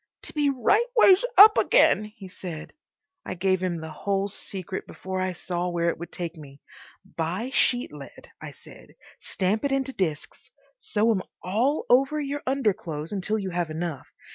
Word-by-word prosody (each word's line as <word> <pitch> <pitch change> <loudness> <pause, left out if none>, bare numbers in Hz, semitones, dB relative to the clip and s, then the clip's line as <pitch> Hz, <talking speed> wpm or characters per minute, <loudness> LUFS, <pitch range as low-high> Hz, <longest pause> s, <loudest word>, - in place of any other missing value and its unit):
"To - - -7
be 295 -2 +2
right 280 - +2
ways 390 -2 +7
up 420 +2 +9
again—" - - +4
he 210 -2 -12
said. 175 -4 -8 0.5
I 185 - -5
gave 185 +1 +1
him 180 -2 -1
the 160 0 -7
whole 195 +5 -1
secret 190 -1 -7
before 190 0 -5
I 185 0 -1
saw 175 0 -3
where 170 -1 0
it 170 - -4
would 170 - -8
take 170 -1 -5
me. 140 -2 -13 0.5
"Buy 185 +7 -4
sheet 245 - +1
lead," 140 -2 -12
I - - -7
said, - - -15 0.2
"stamp 195 +4 -1
it 280 - 0
into 270 0 -1
discs. 160 - -4 0.3
Sew 220 +2 +1
'em 195 -4 0 0.2
all 235 +11 0
over 275 +5 +3
your 290 0 -3
underclothes 190 - -1
until 205 +2 -1
you 195 -3 -4
have 175 -2 -2
enough. 155 -3 -5
190 Hz, 170 wpm, -25 LUFS, 170-250 Hz, 0.5 s, up